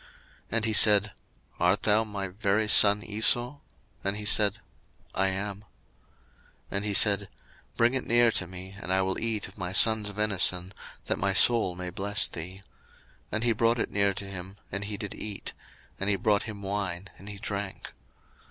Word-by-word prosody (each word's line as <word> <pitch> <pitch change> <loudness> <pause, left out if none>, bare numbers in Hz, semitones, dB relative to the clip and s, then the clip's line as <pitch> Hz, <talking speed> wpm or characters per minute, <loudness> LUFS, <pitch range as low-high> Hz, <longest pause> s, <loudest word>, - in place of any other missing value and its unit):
01:027:024 - - -23 0.5
And 115 -1 +1
he 110 - -1
said, 105 -1 +5 0.5
Art - - +1
thou 105 +2 +3
my 100 -3 -6
very 105 +2 -1
son 105 0 +7
Esau? 120 +5 +1 0.4
And 100 +1 -2
he 105 - -6
said, 105 0 +3 0.6
I 95 - +1
am. 95 +1 -3
01:027:025 - - -23 1.1
And 100 +1 -2
he 105 - -1
said, 100 -1 +4 0.5
Bring 120 +2 +2
it 130 - -2
near 120 0 +4
to 95 - 0
me, 95 +1 -10
and 90 - -6
I 95 0 +2
will 95 0 -3
eat 110 -2 -2
of 95 +2 -17
my 90 -1 -4
son's 110 +1 +5
venison, 100 -3 -1 0.3
that - - -2
my 100 0 0
soul 110 -2 +4
may 90 0 -7
bless 100 +3 +1
thee. 90 +4 -8 0.7
And 110 +2 -2
he 120 - +2
brought 115 +1 +1
it - - -3
near 100 -1 +1
to 100 - -3
him, 95 0 -8 0.2
and 100 +1 -4
he 105 0 -5
did 105 -1 -6
eat: 105 -2 -7 0.5
and 95 - -1
he 100 - +3
brought 100 +1 0
him 100 -2 -8
wine 95 -2 -4
and 100 +3 -11
he 105 - -9
drank. 100 -1 -6
100 Hz, 185 wpm, -27 LUFS, 95-110 Hz, 1.1 s, son